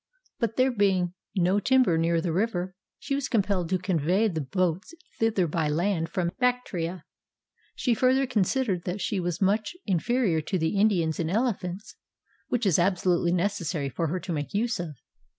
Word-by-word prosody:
But 230 -2 -1
there 260 +1 +3
being 190 -5 +1 0.2
no 185 +2 +3
timber 255 -6 +3
near 165 0 +1
the 165 -1 -2
river, 185 -2 -1 0.2
she - - -4
was 275 -1 -1
compelled 195 -6 0
to 185 - +2
convey 185 +3 +1
the 165 -6 -2
boats 185 - -1 0.2
thither 225 -5 +2
by 160 -1 -1
land 165 +1 0
from 175 -1 -1
Bactria. 185 -9 -1 0.7
She 245 - +1
further 260 +3 +3
con 245 -5 +1
sidered 190 -3 0
that 180 +3 -3
she 200 0 -1
was 175 +1 -1
much 210 - +1
inferior 190 -1 +1
to 185 +5 -2
the 160 +4 0
Indians 175 -7 +2
in 165 -1 -1
elephants 205 -2 -2 0.5
(which 245 -2 -1
it - - +5
was 175 - +3
absolutely 175 -1 +2
necessary 175 -5 -1
for 165 +6 -2
her 180 +4 -2
to 175 - -4
make 145 +4 -4
use 230 +1 0
of). 165 -4 -5
185 Hz, 175 wpm, -27 LUFS, 170-220 Hz, 0.7 s, it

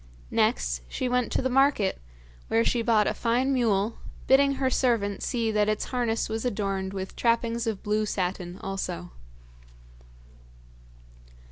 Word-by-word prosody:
Next - - +1
she 255 - -2
went 250 -1 0
to - - 0
the - - +2
market, 270 -6 +2 0.5
where 115 - +2
she 240 - +1
bought 225 -2 +3
a - - 0
fine 250 +3 +1
mule, 225 -4 +1 0.3
bidding 275 +1 +5
her 265 -1 0
servant 225 -7 +1
see 230 -2 -1
that 210 -1 +2
its 215 - -1
harness 235 -3 0
was 220 0 -3
adorned 195 -5 -2
with 190 -1 -6
trappings 230 0 +1
of 215 -3 -3
blue 210 +1 0
satin 180 -2 -3
also. 190 - -4
220 Hz, 140 wpm, -27 LUFS, 195-245 Hz, 0.5 s, bidding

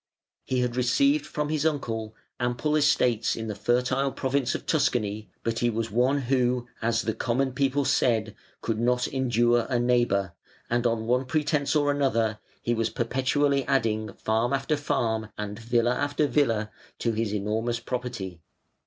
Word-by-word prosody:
He 130 -1 0
had 125 -1 -1
received 280 - +2
from 150 0 -2
his 155 -1 0
uncle 115 -8 -2 0.2
ample 120 +5 0
estates 125 -6 +2
in 110 - -5
the 110 - -3
fertile 125 +5 +1
province 130 -1 0
of - - -5
Tuscany, 110 - 0
but 115 0 -1
he 120 - +2
was 115 -1 -2
one 130 +5 +2
who, 125 -1 +1
as 115 0 +1
the 110 - -1
common 125 +4 0
people 135 +2 +1
said, 115 -5 +2 0.3
"could 110 -1 -2
not 125 +1 +1
endure 120 -2 +2
a 125 - +1
neighbour", 120 -7 +1 0.4
and, 120 0 +2
on 115 -1 -1
one 125 +3 +1
pretence 150 +1 0
or 145 -1 +2
other, 110 -5 +1 0.2
he 120 - +1
was 115 -1 0
perpetually 135 +3 +1
adding 110 -6 0
farm 115 +4 0
after 135 +3 +1
farm 110 -6 -1
and 105 +1 -5
villa 120 +1 +1
after 145 +3 0
villa 115 -6 +1 0.3
to 115 - 0
his 110 -1 -1
enormous 110 +3 -1
property. 115 -9 -5
120 Hz, 160 wpm, -26 LUFS, 115-135 Hz, 0.4 s, received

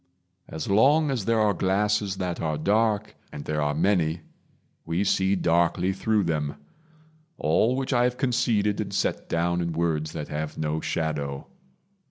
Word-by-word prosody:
As 80 -2 -6
long 140 +9 +4
as 120 -7 -2
there 115 -1 +2
are 105 -1 +3
glasses 100 +1 0
that 90 -2 -3
are 75 -2 -1
dark 105 +5 +1 0.2
And 70 - -8
there 75 0 -1
are 75 0 0
many 80 -2 +1 0.6
we 85 +4 -1
see 95 0 +2
darkly 85 +1 +1
through 105 +2 +1
them; 75 -4 -1 0.8
All 110 +11 +2
which 135 +1 -2
have 125 -1 +3
I - - -21
conceded 115 -6 +1
and - - -5
set - - -1
down 85 +1 0
In 85 -1 -2
words 80 -2 -1
that 75 - -5
have 75 0 -4
no 80 0 -1
shadow. 75 -3 -3
90 Hz, 160 wpm, -25 LUFS, 80-105 Hz, 0.8 s, long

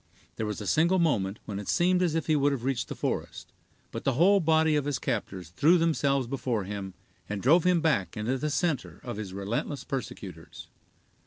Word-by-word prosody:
There 110 - -3
was 105 - -4
a - - -6
single 170 +4 +3
moment 110 - +1
when 100 -2 -5
it 105 - -8
seemed 180 +1 +2
as 170 -3 +1
if 165 - -1
he 155 - +2
would 145 0 +3
have 135 -4 -3
reached 135 -2 -1
the - - -6
forest, - - -4 0.4
but - - -6
the 135 - +1
whole 190 +9 +5
body 160 -2 +3
of 145 -2 0
his 145 -2 -1
captors 100 - -4
threw 150 - +4
themselves 140 -5 +1
before 120 -4 -2
him, 95 -1 -6 0.3
and 105 -1 -3
drove 160 - +4
him 180 -2 +3
back 135 - 0
into 120 +5 -1
the 150 - -1
center 150 -1 -1
of 120 -4 -5
his 105 -3 -5
relentless 100 +8 -3
persecutors. 135 -5 -7
135 Hz, 200 wpm, -28 LUFS, 105-160 Hz, 0.4 s, whole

